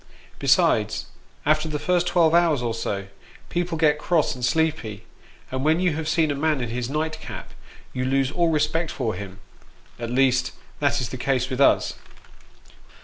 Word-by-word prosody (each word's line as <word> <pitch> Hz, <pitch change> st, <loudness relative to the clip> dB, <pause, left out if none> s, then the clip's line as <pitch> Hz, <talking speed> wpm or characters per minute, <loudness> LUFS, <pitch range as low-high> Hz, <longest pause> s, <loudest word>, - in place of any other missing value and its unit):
Besides, -, -, +2 dB, 0.4 s
after 155 Hz, +1 st, +2 dB
the 150 Hz, -, -2 dB
first 175 Hz, +3 st, +1 dB
twelve 165 Hz, -3 st, +3 dB
hours 165 Hz, -6 st, +3 dB
or 115 Hz, -1 st, -1 dB
so, 100 Hz, -3 st, -3 dB, 0.4 s
people 175 Hz, -1 st, -1 dB
get 150 Hz, -2 st, +3 dB
cross 165 Hz, -1 st, +1 dB
and 125 Hz, -, -9 dB
sleepy, 120 Hz, -7 st, 0 dB, 0.5 s
and 130 Hz, 0 st, -2 dB
when 160 Hz, +3 st, +3 dB
you 180 Hz, -3 st, +2 dB
have 155 Hz, +1 st, -3 dB
seen 160 Hz, -2 st, +2 dB
a -, -, -1 dB
man 155 Hz, 0 st, +1 dB
in 120 Hz, -2 st, -3 dB
his 120 Hz, +1 st, -3 dB
nightcap, 155 Hz, +2 st, -4 dB, 0.4 s
you 125 Hz, -, -2 dB
lose 135 Hz, +1 st, +1 dB
all 170 Hz, 0 st, +2 dB
respect 155 Hz, +1 st, +1 dB
for 115 Hz, -5 st, -2 dB
him; 100 Hz, -2 st, -7 dB, 0.6 s
at 115 Hz, -1 st, -4 dB
least, 130 Hz, 0 st, +2 dB, 0.3 s
that 145 Hz, -1 st, +1 dB
is 120 Hz, -, -3 dB
the 130 Hz, -, -6 dB
case 130 Hz, 0 st, 0 dB
with 130 Hz, +1 st, -1 dB
us. -, -, +4 dB
145 Hz, 170 wpm, -24 LUFS, 125-160 Hz, 0.6 s, us